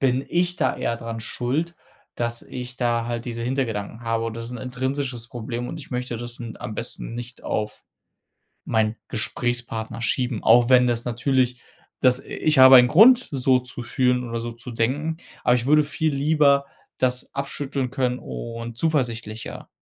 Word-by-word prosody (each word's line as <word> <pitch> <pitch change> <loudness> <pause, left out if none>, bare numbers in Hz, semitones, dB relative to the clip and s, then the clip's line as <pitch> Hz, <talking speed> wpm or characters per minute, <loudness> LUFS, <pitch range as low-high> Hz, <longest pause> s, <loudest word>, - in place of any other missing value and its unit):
bin 130 0 +1
ich 175 +1 0
da 130 - +1
eher 115 - -1
dran 115 -1 -6
schuld, 140 +9 -2 0.4
dass 120 0 -1
ich 125 0 -7
da 120 -1 0
halt 120 0 -3
diese 115 -1 -4
Hintergedanken 115 -4 -2
habe 115 0 -1
und 115 - -4
das 115 0 -5
ist - - -7
'n 125 - -6
intrinsisches 130 -1 -3
Problem 120 +1 -5
und 160 - -6
ich 145 - -11
möchte 125 -1 -3
das 120 +1 -6
n 115 -2 -7
am 105 - -6
besten 115 0 -3
nicht 120 +1 -7
auf 105 0 -3 0.8
meinen 110 0 +1
Gesprächspartner 120 -2 -3
schieben, 120 -1 -1
auch 120 +2 +6
wenn 125 -1 +6
das 120 -1 0
natürlich 125 +1 0 0.4
das 125 0 +4
i - - -15
ich 155 -2 +1
habe 130 0 +10
einen 125 0 +7
Grund, 235 - +7
so 130 -1 +3
zu 125 -1 -6
fühlen 125 +1 +1
oder 115 - -2
so 120 - -4
zu 120 +2 -8
denken, 145 +8 -1 0.3
aber 125 - +4
ich 120 - -1
würde 150 +2 +5
viel 155 0 -1
lieber 140 -1 +3 0.3
das 125 -1 -1
abschütteln 140 -1 -3
können 125 -1 -1
und 115 - -7
zuversichtlicher 120 -8 -2
125 Hz, 175 wpm, -23 LUFS, 115-135 Hz, 0.8 s, habe